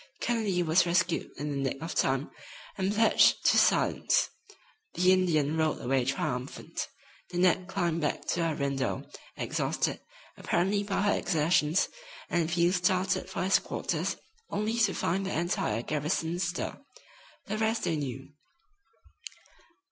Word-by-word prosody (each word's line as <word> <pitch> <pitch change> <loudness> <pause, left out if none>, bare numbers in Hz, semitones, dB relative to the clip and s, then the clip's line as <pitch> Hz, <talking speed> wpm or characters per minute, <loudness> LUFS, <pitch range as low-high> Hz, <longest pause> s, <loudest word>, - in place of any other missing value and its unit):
Kennedy 215 -7 0
was 170 +2 +3
rescued 175 0 +1
in 145 +1 -3
the 140 - -2
nick 135 - -6
of 165 +3 -5
time, 135 +2 0 0.4
and 190 0 0
pledged 220 +2 +4
to - - +5
silence. - - +3 0.6
The 180 +1 +5
Indian 160 -5 +2
rode 160 -1 +1
away 130 0 0
triumphant. 135 -1 -3 0.4
Nanette 180 +1 +2
climbed 175 -4 -1
back 150 - -2
to 170 - +1
her 160 - -1
window, 140 -2 -2 0.3
exhausted, - - -1 0.4
apparently, 195 +4 +1
by 200 -1 -1
her 205 - +3
exertions, 160 -1 +2 0.4
and 170 -1 +1
Field 175 +1 +3
started 185 +1 +1
for 190 - -3
his 185 0 +4
quarters, - - -2 0.3
only 220 +3 -1
to 210 -4 +3
find 190 +4 0
the 190 -4 -2
entire 140 - -1
garrison 155 +4 -1
astir. 175 0 -3 0.7
The 215 - -3
rest 220 +1 0
they 165 - 0
knew. 135 -2 -5
175 Hz, 135 wpm, -29 LUFS, 150-190 Hz, 0.7 s, to